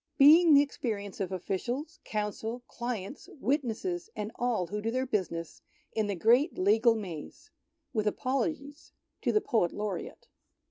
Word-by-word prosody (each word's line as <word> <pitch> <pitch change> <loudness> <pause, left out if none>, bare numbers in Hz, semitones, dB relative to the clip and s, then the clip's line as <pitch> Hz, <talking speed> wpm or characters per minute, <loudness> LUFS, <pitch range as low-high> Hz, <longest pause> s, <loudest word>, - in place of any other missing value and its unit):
Being 310 +3 +8
the 285 - +7
experience 210 -8 -4
of 190 -2 -2
Officials, 240 - -3
Counsel, 220 +3 -3
Clients, 235 -1 -5
Wit 280 +3 +2
nesses, 350 - -3
and 210 +1 -4
all 240 -7 0
who 210 +4 -4
do 225 - -1
their 255 +3 0
business 180 -8 -3 0.3
in 220 -2 0
the 200 - -1
Great 240 - +3
Legal 220 +5 +4
Maze. 195 - -7 0.4
With 215 -3 0
apologies 280 +5 -2 0.3
to - - +1
the 425 - +3
Poet 225 - +1
Laureate. 205 -4 -5
225 Hz, 145 wpm, -30 LUFS, 205-275 Hz, 0.4 s, Being